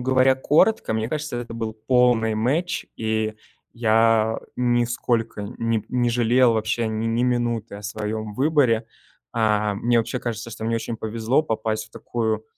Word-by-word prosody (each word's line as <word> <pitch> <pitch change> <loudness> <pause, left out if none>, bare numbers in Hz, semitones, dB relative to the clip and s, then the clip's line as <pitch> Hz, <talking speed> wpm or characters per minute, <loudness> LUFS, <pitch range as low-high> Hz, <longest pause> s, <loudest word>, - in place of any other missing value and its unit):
говоря 130 +1 +4
коротко, 150 - +2
мне 110 0 -1
кажется, 150 -2 -3
это 120 -1 -6
был 115 -1 -3
полный 125 -3 +3
match, 145 +11 -1
и 110 -1 -1 0.4
я 115 -1 +3 0.2
нисколько 120 -2 0 0.2
ни 115 -2 0
не 120 -1 +1
жалел 120 0 +3
вообще 110 +1 0
ни 115 +2 -1
минуты 120 -4 -1
о 100 - -10
своём 105 0 -4
выборе. 130 -5 +2 0.5
Э, 105 -2 +1
мне 120 +3 +2
вообще 115 +3 -1
кажется, 115 -1 -5
что 110 - -7
мне 115 +1 0
очень 115 0 -4
повезло 115 +6 0
попасть 110 -5 -2
в - - -25
такую 110 -2 -2
115 Hz, 150 wpm, -23 LUFS, 110-125 Hz, 0.5 s, говоря